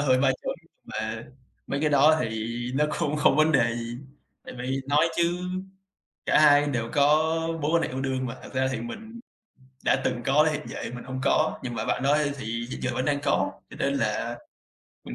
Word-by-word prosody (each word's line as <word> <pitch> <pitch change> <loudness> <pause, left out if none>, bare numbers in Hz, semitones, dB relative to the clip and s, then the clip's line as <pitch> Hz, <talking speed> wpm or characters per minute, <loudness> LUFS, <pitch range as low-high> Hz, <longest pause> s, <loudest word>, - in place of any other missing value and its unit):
hơi 130 -3 +3
ba 135 - +4
trợn, - - -2 0.3
mà 110 +1 -4 0.4
mấy 140 - -2
cái 155 0 +2
đó 150 +2 +6
thì 110 -1 -2 0.3
nó 150 +2 +3
cũng 150 +1 0
không 145 -2 +4
có 155 - +6
vấn 160 - +2
đề 115 -3 +3
gì. 120 0 -5 0.5
Tại - - -9
vì 130 +2 -2
nói 150 +3 +4
chứ 170 +1 +1 0.9
cả - - +4
hai 145 -1 +6
đều 120 -5 -1
có 145 -2 +4 0.6
mối 150 +2 0
quan 165 - +4
hệ - - -1
yêu 130 - -4
đương 130 -1 -1
mà, 115 - -5
thật - - -12
ra 130 0 +2
thì - - -3
mình 220 - -8 0.6
đã - - +2
từng 120 - -1
có 145 +3 +5
hiện 150 0 -3
giờ - - -7 0.2
mình 125 - -8
hông 130 0 -5
có, 155 +2 +2
nhưng 120 -2 -4
mà - - -2
bạn 125 - -1
đó 140 +2 +4
á 150 0 +3
thì 120 - -7 0.2
hiện - - -6
giờ - - -1
vẫn 130 - -1
đang 145 -1 +1
có, 140 - +1 0.2
cho - - -11
nên 140 - +1
là, 115 -1 -1 0.7
mình - - -6
135 Hz, 220 wpm, -26 LUFS, 120-150 Hz, 0.9 s, đó